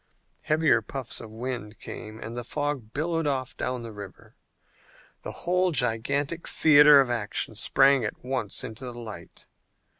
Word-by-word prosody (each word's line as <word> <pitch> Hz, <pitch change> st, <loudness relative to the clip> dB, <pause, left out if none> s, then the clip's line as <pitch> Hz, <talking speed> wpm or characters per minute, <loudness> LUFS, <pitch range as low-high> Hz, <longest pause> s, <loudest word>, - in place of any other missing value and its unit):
Heavier 155 Hz, -6 st, +3 dB
puffs 130 Hz, +3 st, -4 dB
of 115 Hz, -2 st, -10 dB
wind 115 Hz, -2 st, -5 dB
came 110 Hz, +1 st, -8 dB
and 115 Hz, +1 st, -7 dB
the 120 Hz, -, -4 dB
fog 145 Hz, -4 st, -3 dB
billowed 165 Hz, +3 st, -1 dB
off 130 Hz, -3 st, -1 dB
down 125 Hz, -1 st, -3 dB
the 115 Hz, -, -7 dB
river. 100 Hz, -2 st, -11 dB, 0.9 s
The -, -, -6 dB
whole 180 Hz, +1 st, +2 dB
gigantic 140 Hz, +5 st, -1 dB
theater 150 Hz, -1 st, +7 dB
of 130 Hz, -3 st, +2 dB
action 110 Hz, -1 st, -2 dB
sprang 135 Hz, +4 st, +3 dB
at 110 Hz, -, -5 dB
once 125 Hz, -7 st, -2 dB
into 110 Hz, +4 st, -8 dB
the 125 Hz, -2 st, -6 dB
light. 115 Hz, -3 st, -9 dB
125 Hz, 150 wpm, -26 LUFS, 115-145 Hz, 0.9 s, theater